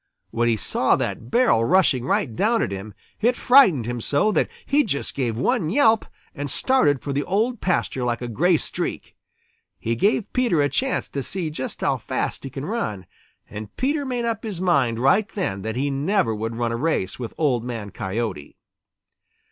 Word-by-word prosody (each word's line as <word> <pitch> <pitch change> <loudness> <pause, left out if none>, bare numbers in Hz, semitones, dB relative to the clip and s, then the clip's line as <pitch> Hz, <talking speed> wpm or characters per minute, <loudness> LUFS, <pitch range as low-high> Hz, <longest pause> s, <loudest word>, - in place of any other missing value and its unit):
When 120 +1 +1
he 115 - +2
saw - - +2
that 115 - -4
barrel 240 - +3
rushing 145 -5 +3
right 115 -3 0
down 225 - +2
at - - -3
him, 100 +2 -7 0.2
it 240 +3 +2
frightened 200 - +5
him 120 0 -3
so 145 - +2
that - - +1 0.2
he 290 +2 +3
just 140 - -3
gave 120 -5 -2
one 155 +5 +1
yelp 225 - +3 0.3
and 145 -1 -5
started 145 - +2
for 140 - -3
the 145 +1 0
Old 220 - 0
Pasture 170 -7 0
like 120 -1 -1
a 120 - -5
gray 160 - +2
streak. - - -4 0.6
He 115 +1 -2
gave 205 - +1
Peter 245 -10 +2
a 145 0 +3
chance 260 - -1
to 140 - -3
see 170 +2 -3
just 130 -4 -5
how - - +1
fast - - -3
he 135 - -5
can 135 +2 -6
run, 110 - -3 0.4
and 105 0 -9
Peter 285 +3 0
made 250 -3 -2
up 225 -2 -1
his 210 -6 -5
mind 140 -11 +2
right 165 - +3
then 175 - -3
that 110 +2 -4
he 140 +3 0
never 150 - +1
would 110 +2 -4
run 120 0 -1
a 115 - -2
race 125 - -1
with 120 -3 -6
Old 130 -7 +1
Man 115 -5 -5
Coyote. 95 -7 -4
140 Hz, 190 wpm, -23 LUFS, -, 0.6 s, frightened